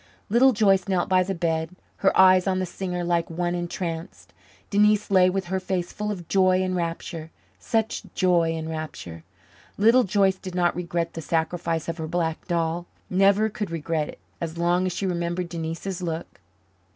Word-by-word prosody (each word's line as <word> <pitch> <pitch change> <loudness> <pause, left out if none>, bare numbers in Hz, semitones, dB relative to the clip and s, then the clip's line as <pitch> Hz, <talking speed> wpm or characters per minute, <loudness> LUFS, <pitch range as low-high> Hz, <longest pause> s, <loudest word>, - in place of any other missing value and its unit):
Little 245 +5 +5
Joyce 195 -5 +3
knelt 185 -2 0
by 185 -1 +4
the 190 +1 -2
bed, 165 0 -1 0.2
her 195 - +2
eyes 185 0 +6
on 190 -1 +1
the 185 - 0
singer 180 0 -4
like 170 -1 0
one 175 +1 -1
entranced. 175 -1 -5 0.4
Denise 210 0 +3
lay 185 -1 +6
with 190 0 -2
her 190 +2 -1
face 185 -2 -3
full 210 0 -3
of 175 -5 -6
joy 185 -1 +3
and 185 0 -1
rapture 165 -1 -4 0.3
such 225 -1 -1
joy 170 -3 +2
and 160 0 -4
rapture! 155 - -6 0.5
Little 230 +5 +5
Joyce 195 -1 +2
did 185 -1 -8
not 175 -1 +2
regret 170 -1 -2
the 165 - -5
sacrifice 165 0 -1
of 165 0 -4
her 160 - -3
black 165 -1 -2
doll 170 0 -1 0.2
never 195 +3 +4
could 210 -2 -4
regret 165 -2 -2
it, - - -9 0.2
as 165 -1 -4
long 175 +2 +2
as - - -1
she 195 - -3
remembered 175 -1 -2
Denise's 170 +3 -4
look. 165 - -5
175 Hz, 175 wpm, -25 LUFS, 165-190 Hz, 0.5 s, eyes